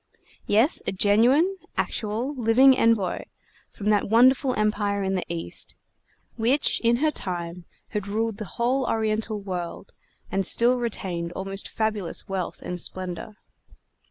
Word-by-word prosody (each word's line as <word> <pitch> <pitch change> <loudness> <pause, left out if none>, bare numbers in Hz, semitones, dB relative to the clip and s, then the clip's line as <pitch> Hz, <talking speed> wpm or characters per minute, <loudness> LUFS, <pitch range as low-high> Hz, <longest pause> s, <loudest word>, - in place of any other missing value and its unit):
Yes, 225 +10 +3
a - - +1
genuine, 240 - +3 0.2
actual, 225 +6 -1
living 255 +1 +5
envoy 225 -7 +2 0.5
from 210 +1 -1
that 205 -1 +2
wonderful 255 +3 +5
Empire 205 -1 0
in 190 0 0
the 185 - -1
East, 170 -1 -3 0.6
which 245 +6 +2
in 235 0 +3
her 305 +5 +2
time 175 - -5 0.2
had 205 -2 -3
ruled 220 +1 -1
the 215 - -5
whole 255 +3 +1
Oriental 220 -1 -1
world, 185 -1 -6 0.4
and 195 - +1
still 240 +6 +3
retained 185 -8 -3
almost 195 +1 -4
fabulous 215 -6 -2
wealth 190 -3 -4
and 180 -1 -3
splendor. 185 +3 -5
215 Hz, 130 wpm, -25 LUFS, 195-235 Hz, 0.6 s, living